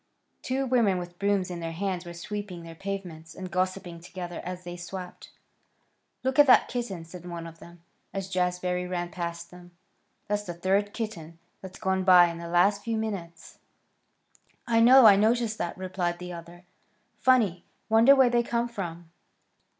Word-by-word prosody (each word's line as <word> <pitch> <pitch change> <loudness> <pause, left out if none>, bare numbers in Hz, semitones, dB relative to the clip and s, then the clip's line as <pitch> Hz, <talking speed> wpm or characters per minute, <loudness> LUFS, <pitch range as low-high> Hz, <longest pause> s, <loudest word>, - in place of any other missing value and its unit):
Two 265 +1 -1
women 235 -7 +2
with 175 0 -7
brooms 200 -2 0
in 175 - -5
their 165 -1 -5
hands 185 0 -3
were 175 - -8
sweeping 195 -1 -6
their 165 0 -9
pavements 165 -4 -7
and 185 0 -7
gossiping 185 -2 -2
together 175 0 -7
as 180 0 -6
they 175 0 -7
swept. 180 +1 -8 0.9
"Look 260 +2 0
at 290 - +8
that 255 - +6
kitten," 205 -9 -4
said 175 +1 -11
one 170 -1 -7
of 165 0 -11
them, 170 0 -15 0.3
as 195 -1 -4
Jazbury 180 -1 -1
ran 175 -1 -3
past 170 -1 -5
them. 175 -1 -15 0.5
"That's 205 0 0
the 175 -4 -7
third 195 +4 +1
kitten 170 -8 -6 0.2
that's 190 -1 -10
gone 190 0 0
by 180 -2 +7
in 170 - -8
the 170 - -7
last 195 +4 +3
few 230 0 -2
minutes." 195 -7 -6 1.1
"I 230 -2 +2
know. 250 +2 +8
I 205 -2 +9
noticed 220 +1 +1
that," 170 - -3
replied 180 -2 -2
the 180 0 -7
other. 170 +1 -11 0.5
"Funny! 220 -9 +3 0.2
Wonder 230 +5 +6
where 260 -3 +5
they 240 0 +3
come 235 0 -1
from!" 175 -7 -7
185 Hz, 170 wpm, -27 LUFS, 175-210 Hz, 1.1 s, I